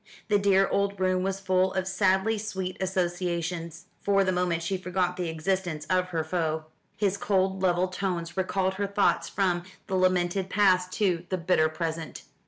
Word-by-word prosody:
The 205 -1 +4
dear 195 -1 +4
old 200 0 0
room 185 0 +2
was 195 +1 -1
full 185 -1 +1
of 190 0 -1
sadly 190 +3 +2
sweet 190 -3 -4
associations. 175 -3 -2 0.2
For 195 -1 +3
the 185 - +1
moment 180 -2 0
she 190 +3 -1
forgot 180 -1 -1
the 180 -2 -2
existence 160 -1 -2
of 185 0 +3
her 165 -3 -2
foe. 160 -1 -1 0.3
His 200 -2 +1
cold 190 -1 +1
level 180 0 +2
tones 180 -3 -3
recalled 190 0 0
her 200 +1 -2
thoughts 200 0 +1
from 180 -3 +1 0.2
the - - -6
lamented 185 0 +1
past 185 -2 +3
to 180 -5 0
the 185 - 0
bitter 165 -2 +2
present. 160 0 -4
185 Hz, 170 wpm, -27 LUFS, 175-190 Hz, 0.3 s, The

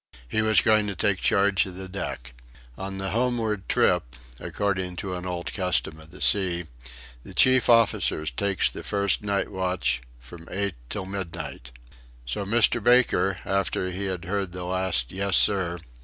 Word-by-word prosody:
He 110 - 0
was 110 -1 +4
going 110 -2 +3
to 100 - -3
take 95 +2 +1
charge 100 -3 +2
of 90 - -9
the 95 0 -7
deck. 90 -10 -6 0.4
On 95 +3 -6
the 95 0 -3
homeward 115 -4 -1
trip, - - +2 0.2
according 95 -3 -2
to 95 +1 -5
an 90 0 -5
old 90 -1 -4
custom 90 -4 0
of 80 0 -15
the 95 - -13
sea, 90 -4 +2 0.6
the - - -13
chief 130 -1 +5
officer 115 -9 +3
takes 95 +8 0
the - - -8
first 100 -1 0
night 100 -1 -1
watch 90 -10 0 0.2
from 80 +8 -13
eight 100 0 -2 0.2
till 100 -3 -4
midnight. 95 -9 -6 0.5
So - - -2
Mr. 115 +1 +3
Baker, 120 -6 +3
after 95 -1 -1
he 95 +2 -4
had 90 -2 -4
heard 95 -1 -2
the 90 -1 -6
last 90 -9 -1
"Yes, 100 +1 +2
sir!" 90 -4 +2
95 Hz, 165 wpm, -25 LUFS, 90-100 Hz, 0.6 s, chief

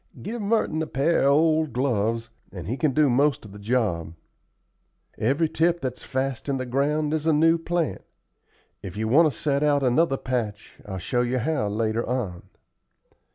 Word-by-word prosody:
Give 225 +3 -4
Merton 205 -6 0
a 160 - -2
pair 140 +2 +1
of 140 - +5
old 155 -1 +2
gloves, 115 -3 -1 0.2
and 90 -4 -8
he 115 +7 -2
can 150 0 +1
do 150 +3 +3
most 135 0 +2
of 105 - -11
the 100 - -11
job. 100 -8 -1 1.0
Every 140 +8 +2
tip 170 +2 +1
that's 130 -4 -4
fast 135 0 -3
in 135 - 0
the 130 - -3
ground 145 +4 0
is 155 0 -1
a 160 - +4
new 165 +2 +4
plant. 170 -1 -2 0.8
If 95 0 -8
you 110 +1 -1
want 155 +6 +5
to 115 - -10
set 140 -2 0
out 145 -2 +2
another 135 +3 +2
patch, 115 -6 -4
I'll 95 -2 -5
show 120 +7 -1
you 125 +1 0
how 130 -2 0
later 110 +2 -1
on." 110 -9 -4
135 Hz, 180 wpm, -25 LUFS, 115-155 Hz, 1.0 s, of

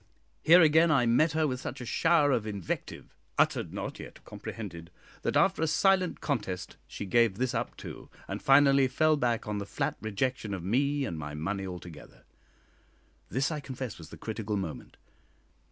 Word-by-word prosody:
Here 170 +4 +7
again 160 +2 +5
I 140 -6 +4
met 150 +8 +3
her 155 0 +2
with 130 -4 -2
such 135 - -6
a 125 - -6
shower 160 +2 +3
of 115 -4 0
invective, 100 -5 -5 0.2
"uttered - - +2
not, - - -5
yet - - -11
comprehended," 85 -7 -8 0.3
that - - 0
after - - +3
a 160 - +2
silent 185 +2 +2
contest 105 - -3
she - - -6
gave 110 0 +3
this 130 0 -1
up - - -3
too, - - -9 0.2
and - - -5
finally 135 -1 +5
fell 155 +4 +3
back 120 -6 -1
on 105 -1 -2
the 100 - -4
flat - - -2
rejection 110 0 -2
of 90 - -7
me 140 +8 +1
and 85 -7 -4
my 75 -1 -6
money 95 +5 -3
altogether. 85 -4 -10 1.1
This, 135 - 0
I 155 - -2
confess, 130 -6 -6
was 80 -1 -11
the - - -11
critical 110 -1 -3
moment. 90 -6 -6
120 Hz, 175 wpm, -29 LUFS, 100-145 Hz, 1.1 s, Here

